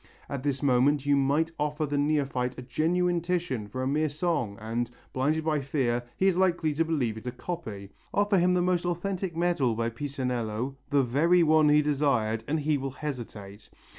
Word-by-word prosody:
At 140 Hz, -2 st, -4 dB
this 140 Hz, 0 st, -2 dB
moment 140 Hz, +2 st, +3 dB
you 145 Hz, 0 st, +4 dB
might 145 Hz, +4 st, +2 dB
offer 150 Hz, +1 st, -1 dB
the 145 Hz, 0 st, -3 dB
neophyte 140 Hz, -4 st, 0 dB
a 125 Hz, -, -6 dB
genuine 170 Hz, +7 st, +1 dB
Titian 170 Hz, -11 st, -2 dB
for 130 Hz, +5 st, -4 dB
a -, -, -1 dB
mere 150 Hz, +3 st, +1 dB
song 145 Hz, -, -1 dB
and, 115 Hz, +2 st, -2 dB, 0.2 s
blinded 150 Hz, +4 st, 0 dB
by 155 Hz, -2 st, +1 dB
fear, 130 Hz, -4 st, 0 dB, 0.2 s
he 190 Hz, -, +1 dB
is 190 Hz, -2 st, +4 dB
likely 175 Hz, -4 st, +2 dB
to 160 Hz, +3 st, +2 dB
believe 135 Hz, -9 st, -1 dB
it 125 Hz, -, -11 dB
a -, -, -1 dB
copy; 110 Hz, -, -6 dB, 0.2 s
offer 205 Hz, -1 st, +2 dB
him 180 Hz, +1 st, +3 dB
the 180 Hz, -, +2 dB
most 180 Hz, -1 st, +1 dB
authentic 175 Hz, 0 st, -2 dB
medal 170 Hz, -9 st, +1 dB
by 115 Hz, +1 st, -1 dB
Pisanello, 125 Hz, -2 st, -3 dB
the 140 Hz, -1 st, +3 dB
very 165 Hz, +8 st, +3 dB
one 155 Hz, -1 st, +5 dB
he 150 Hz, 0 st, +5 dB
desired, 135 Hz, -7 st, +1 dB
and 155 Hz, +1 st, 0 dB
he 150 Hz, 0 st, +1 dB
will 135 Hz, +1 st, -3 dB
hesitate. 115 Hz, -8 st, -7 dB
145 Hz, 190 wpm, -28 LUFS, 125-165 Hz, 0.2 s, one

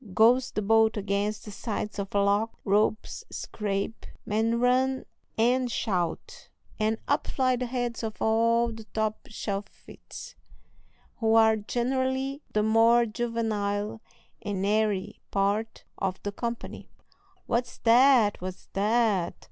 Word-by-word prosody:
goes 245 Hz, +3 st, +5 dB
the 215 Hz, -, -3 dB
boat 220 Hz, +1 st, +4 dB
against 205 Hz, +1 st, -1 dB
the 210 Hz, -, -8 dB
sides 210 Hz, 0 st, -4 dB
of 200 Hz, 0 st, -5 dB
a -, -, +4 dB
lock; 205 Hz, +3 st, +1 dB
ropes 210 Hz, +2 st, +1 dB
scrape, 205 Hz, +1 st, -4 dB, 0.2 s
men 225 Hz, +2 st, +1 dB
run 260 Hz, +2 st, +2 dB, 0.3 s
and 245 Hz, +2 st, +2 dB
shout; 180 Hz, -8 st, -3 dB, 0.3 s
and 220 Hz, +1 st, +1 dB
up 285 Hz, -, +1 dB
fly 255 Hz, -1 st, +1 dB
the 250 Hz, 0 st, -3 dB
heads 240 Hz, -1 st, -3 dB
of 220 Hz, -2 st, -5 dB
all 230 Hz, +1 st, +2 dB
the 220 Hz, -1 st, -10 dB
top 220 Hz, +2 st, -1 dB
shelfites, 205 Hz, -2 st, -7 dB, 0.8 s
who 225 Hz, -1 st, +2 dB
are 220 Hz, -1 st, +6 dB
generally 260 Hz, +5 st, -1 dB
the 210 Hz, -, +1 dB
more 230 Hz, +2 st, +5 dB
juvenile 220 Hz, -2 st, -2 dB, 0.4 s
and 195 Hz, -2 st, -2 dB
airy 210 Hz, -1 st, 0 dB
part 205 Hz, +3 st, -1 dB, 0.2 s
of 190 Hz, -1 st, -2 dB
the 205 Hz, -, -2 dB
company. 235 Hz, +3 st, -5 dB, 0.6 s
"What's 240 Hz, 0 st, -1 dB
that! 235 Hz, -3 st, +5 dB
what's 185 Hz, 0 st, -7 dB
that!" 210 Hz, -2 st, +1 dB
220 Hz, 125 wpm, -27 LUFS, 205-235 Hz, 0.8 s, are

